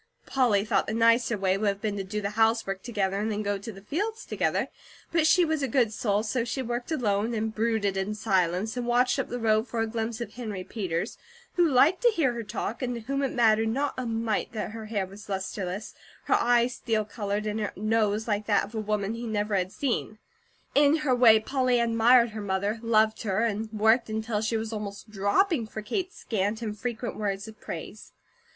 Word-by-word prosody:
Polly 230 -7 +2
thought - - +1
the 215 - -2
nicer 230 0 +3
way 190 0 +1
would 215 - 0
have 200 0 0
been 210 -2 -1
to 195 - -3
do 210 +2 -4
the 200 0 -2
housework 220 -3 +1
together 200 -5 -1
and 215 +2 -1
then 210 0 -2
go 205 -1 -1
to 225 +4 -7
the 195 -1 -13
fields 415 - -3
together; - - 0 0.4
but 330 -2 +3
she 350 +2 +5
was 315 -2 -1
a 275 - 0
good 235 -3 +2
soul, 210 -1 0
so 230 +2 -1
she 250 +3 -3
worked 240 +4 -4
alone 225 -5 0
and 220 0 -2
brooded 220 -3 0
in 195 +2 -2
silence, 190 0 0
and 245 -1 -3
watched 250 +2 +3
up 270 - -1
the 245 - -3
road 220 0 +2
for 235 - -3
a 225 - +2
glimpse 225 +1 -3
of 235 - -6
Henry 215 -6 -5
Peters, 185 -1 -3 0.3
who 350 - +3
liked 290 +7 +4
to - - +5
hear 320 - +1
her 235 - -4
talk, 220 +2 -4
and 245 -1 -2
to 235 - -5
whom 275 +5 -2
it 275 - 0
mattered 225 -2 +3
not 275 +5 0
a 255 -2 -3
mite 225 -1 -1
that 215 -1 -3
her 220 0 -7
hair 205 -3 -1
was 200 +2 -13
lustreless, 190 +1 -4 0.3
her - - +1
eyes 240 +1 +3
steel 220 -3 -1
coloured, 205 -1 -3
and 210 +1 -2
her 210 -2 -2
nose 215 +1 +1
like 210 -1 -1
that 205 - +3
of 210 - -15
a 220 - -2
woman 210 -1 -1
he 235 +1 -5
never 210 -1 -1
had 185 -1 0
seen. 240 -4 -2 0.6
In 290 +1 +5
her 260 - +3
way, 235 -3 +7
Polly 255 +1 +1
admired 235 +1 +4
her 215 0 -6
mother, 200 +2 -1
loved 220 -1 +2
her, 195 -1 0
and 220 -1 -1
worked 220 +2 +3
until 220 0 -2
she 225 +1 0
was 220 0 -4
almost 210 0 -6
dropping 220 - +1
for 215 0 -7
Kate's 370 - -3
scant, 215 +1 -2
infrequent 225 +2 -4
words 200 -1 -2
of 220 0 -12
praise. - - -8
220 Hz, 215 wpm, -27 LUFS, 205-240 Hz, 0.6 s, way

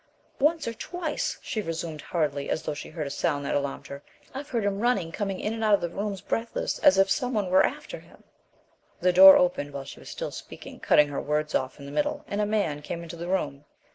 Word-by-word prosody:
"Once 305 +1 +2
or 230 - -2
twice," 330 +5 -3
she 215 - -2
resumed 165 -4 -5
hurriedly, 145 -4 -2
as - - -1
though 155 - -2
she 145 - -8
heard 155 -1 -4
a - - -4
sound 145 0 -1
that - - -1
alarmed 140 -1 -2
her, 140 0 -8 0.3
"I've 275 +2 -7
heard 230 -4 -1
him 200 -1 0
running 205 -8 +1
coming 195 0 -3
in 215 - -2
and 225 0 -4
out 210 -1 +5
of - - -4
the 170 - -2
rooms 200 +1 -4
breathless 230 +1 -2
as 190 - +6
if 195 0 +5
something 220 -6 -1
were 185 +1 +6
after - - -3
him - - -20 0.4
" - - -38
The 180 0 +4
door 190 +1 +10
opened 160 -5 0
while 140 -1 -5
she - - -10
was - - -11
still - - -5
speaking, - - -10
cutting 150 -1 +4
her 145 - -3
words 150 +1 -1
off 130 +2 -1
in 140 - -9
the 140 - -8
middle, 295 - -1
and 205 +1 -2
a 210 - +1
man 200 -9 0
came 170 +3 -5
into 170 0 -8
the 170 +1 -6
room. 145 -7 -2
180 Hz, 240 wpm, -27 LUFS, 150-215 Hz, 0.4 s, door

